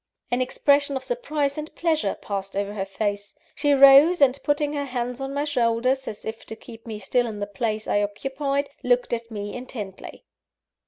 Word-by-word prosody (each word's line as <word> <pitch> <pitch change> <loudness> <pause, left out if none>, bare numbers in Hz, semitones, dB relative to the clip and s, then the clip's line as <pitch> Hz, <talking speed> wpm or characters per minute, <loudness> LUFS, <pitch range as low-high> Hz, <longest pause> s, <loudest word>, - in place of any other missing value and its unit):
An 245 +1 +1
expression 280 +2 +2
of 265 - -3
surprise 305 - -2
and 305 +1 -8
pleasure 325 -2 0
passed 195 -1 -5
over 200 0 -2
her 195 -2 -3
face; 205 0 -3 0.2
she 290 0 +1
rose, 275 +5 +8
and 275 -1 +4
putting 290 0 0
her 285 -1 -2
hands 250 -1 -3
on 270 0 -3
my 285 +1 -1
shoulders, 255 -1 +1
as 210 - -7
if 220 0 -6
to 220 - -6
keep 225 +1 -13
me 220 -2 -5
still 240 +4 0
in 215 -2 -6
the 205 - -1
place 215 +2 -3
I 205 - +2
occupied, 275 +7 -2
looked 245 -1 +1
at 230 0 -3
me 205 -2 -5
intently. 225 -6 -8
250 Hz, 190 wpm, -24 LUFS, 215-280 Hz, 0.2 s, rose